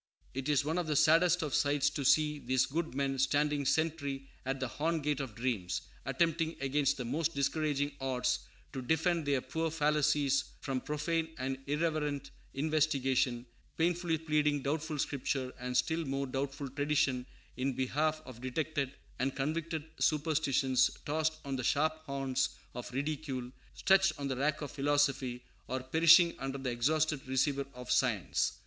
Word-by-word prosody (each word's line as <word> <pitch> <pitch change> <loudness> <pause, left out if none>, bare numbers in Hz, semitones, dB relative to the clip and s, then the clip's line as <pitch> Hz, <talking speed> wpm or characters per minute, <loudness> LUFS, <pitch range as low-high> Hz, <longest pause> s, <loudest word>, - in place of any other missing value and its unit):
It 135 +2 -3
is 145 -1 +3
one 160 +4 0
of 175 - -2
the 150 - 0
saddest 170 +4 +5
of 150 -4 -3
sights 145 -1 +2
to 145 - -3
see 150 +2 +3
these 130 -1 +2
good 150 0 -3
men 135 -1 0
standing 145 +1 +2
sentry 140 -3 0 0.2
at 135 0 -1
the 130 - -1
horn 160 +7 -1
gate 145 -1 0
of 130 -6 -5
dreams; 115 -7 -1 0.3
attempting 165 -1 +1
against 140 +1 +1
the 125 - -4
most 155 +6 -1
discouraging 145 0 0
odds 130 -2 0 0.3
to 130 - -4
defend 160 +3 +1
their 140 -2 +2
poor 165 +3 -2
fallacies 150 -3 +2
from 130 -2 -2
profane 160 +2 -1
and 130 0 -3
irreverent 150 -2 -1 0.2
investigation; 135 -5 +1 0.3
painfully 170 0 +1
pleading 150 -2 +1
doubtful 155 +2 -2
Scripture 135 -2 -2
and 125 0 -1
still 165 0 +1
more 135 -1 -2
doubtful 135 +2 -3
tradition 140 -2 0 0.3
in 130 +1 -1
behalf 155 +5 0
of 120 -2 -11
detected 140 +1 -2 0.3
and 135 +2 0
convicted 155 +3 -2
superstitions 145 -4 +2 0.2
tossed 155 +1 +1
on 135 -1 -2
the 130 - -3
sharp 155 +5 +2
horns 135 -1 0 0.2
of 125 0 -7
ridicule, 135 -2 -3 0.2
stretched 190 -3 +4
on 140 -1 -3
the 130 - -1
rack 145 +4 0
of 145 - -5
philosophy, 140 -3 +1 0.2
or 130 0 -3
perishing 170 +5 +6
under 135 0 -3
the 135 -2 -2
exhausted 150 +4 +1
receiver 135 +1 +1
of 125 0 -6
science. - - +1
145 Hz, 155 wpm, -32 LUFS, 135-155 Hz, 0.3 s, perishing